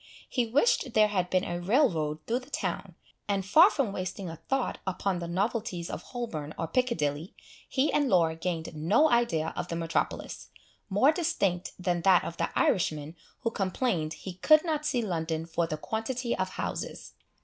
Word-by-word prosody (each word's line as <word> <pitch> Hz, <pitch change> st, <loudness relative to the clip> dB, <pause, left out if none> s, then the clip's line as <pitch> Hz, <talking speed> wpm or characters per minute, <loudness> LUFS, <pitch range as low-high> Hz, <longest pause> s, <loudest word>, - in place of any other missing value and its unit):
He 245 Hz, -3 st, 0 dB
wished 265 Hz, -, +2 dB
there 215 Hz, -1 st, +5 dB
had 185 Hz, -3 st, 0 dB
been 185 Hz, 0 st, +2 dB
a 175 Hz, -2 st, -3 dB
rail 250 Hz, +11 st, +4 dB
road 155 Hz, -5 st, -3 dB
through 235 Hz, +2 st, 0 dB
the 260 Hz, +2 st, -15 dB
town; -, -, -3 dB, 0.3 s
and 200 Hz, -2 st, 0 dB
far 325 Hz, -, +7 dB
from 270 Hz, -, -1 dB
wasting 185 Hz, -1 st, -4 dB
a 165 Hz, -, -8 dB
thought 270 Hz, -, -2 dB
upon 190 Hz, 0 st, -1 dB
the 170 Hz, -, -4 dB
novelties 190 Hz, -1 st, -2 dB
of -, -, -5 dB
Holborn 160 Hz, -, -5 dB
or 165 Hz, -, -1 dB
Piccadilly, 160 Hz, -, -1 dB, 0.3 s
he 275 Hz, +3 st, +1 dB
and 290 Hz, -3 st, +2 dB
Laura 165 Hz, -5 st, +3 dB
gained 165 Hz, -1 st, -3 dB
no 210 Hz, -, +3 dB
idea 165 Hz, -10 st, +1 dB
of -, -, -3 dB
the 170 Hz, -, -4 dB
metropolis, 165 Hz, 0 st, -2 dB, 0.4 s
more 210 Hz, +9 st, +5 dB
distinct 255 Hz, -, -1 dB
than 175 Hz, -1 st, -1 dB
that 185 Hz, 0 st, +5 dB
of 170 Hz, -, -6 dB
the -, -, 0 dB
Irishman 155 Hz, -3 st, +1 dB, 0.3 s
who 230 Hz, -, -1 dB
complained 185 Hz, -5 st, -1 dB
he 190 Hz, -, -8 dB
could 310 Hz, -, +5 dB
not 305 Hz, -2 st, -1 dB
see 245 Hz, -3 st, 0 dB
London 165 Hz, -4 st, -2 dB
for 165 Hz, 0 st, -1 dB
the 155 Hz, -, -3 dB
quantity 235 Hz, +7 st, -2 dB
of 185 Hz, 0 st, -1 dB
houses. -, -, -5 dB
190 Hz, 180 wpm, -29 LUFS, 165-240 Hz, 0.4 s, far